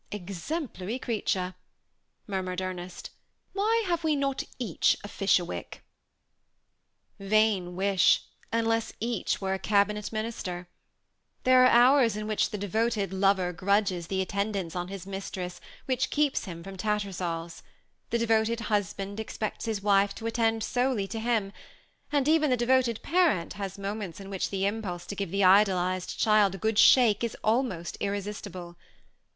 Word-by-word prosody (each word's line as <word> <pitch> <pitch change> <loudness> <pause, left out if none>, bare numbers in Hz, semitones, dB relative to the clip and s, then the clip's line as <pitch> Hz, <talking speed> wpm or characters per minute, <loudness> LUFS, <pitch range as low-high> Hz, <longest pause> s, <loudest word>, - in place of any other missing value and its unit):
"Exemplary 205 - -4
creature," 200 -7 -2 0.7
murmured 185 -2 -3
Ernest; 185 -1 -6 0.4
"why 440 +3 +2
have 340 -2 -1
we 310 -2 +2
not 275 -1 -1 0.2
each 225 -10 +1
a - - -6
Fisherwick?" 195 -4 -1 1.4
Vain 195 -3 +2
wish, 195 -1 +3 0.3
unless 225 0 0
each 230 -1 -1
were 190 -1 -1
a 190 - -2
cabinet 210 0 +1
minister. 215 -5 -4 0.8
There 255 0 +6
are - - +8
hours 245 -2 +5
in 215 - -4
which 215 -1 +1
the 210 - -4
devoted 205 0 -1
lover 190 -2 +2
grudges 185 -1 0
the 190 -1 -1
attendance 200 -2 -2
on 175 0 -3
his 195 -1 -7
mistress 190 -2 -6 0.2
which 260 -1 0
keeps 295 -4 +1
him 170 -3 -8
from 195 +1 -9
TattersalFs; 180 -5 -3 0.5
the 235 - +1
devoted 225 0 +1
husband 200 0 -2
expects 220 -1 -4
his 215 -3 -2
wife 200 -1 +3
to 225 - -8
attend 225 -1 +1
solely 245 -5 0
to 225 - -4
him, 220 -4 0 0.6
and 285 -2 +1
even 310 -1 +4
the 250 - +2
devoted 240 -1 +2
parent 325 - +2
has 195 -1 -5
moments 200 -3 -5
in 195 0 -9
which 190 - -2
the 195 -1 -1
impulse 200 -4 -3
to 200 - -6
give 200 -2 -3
the 195 +3 0
idolized 185 -1 +3
child 215 -3 +4
a - - -6
good 220 +2 0
shake 235 -5 +6
is 235 - -2
almost 215 -7 0
irresistible. 200 -3 -5
205 Hz, 145 wpm, -28 LUFS, 190-230 Hz, 1.4 s, are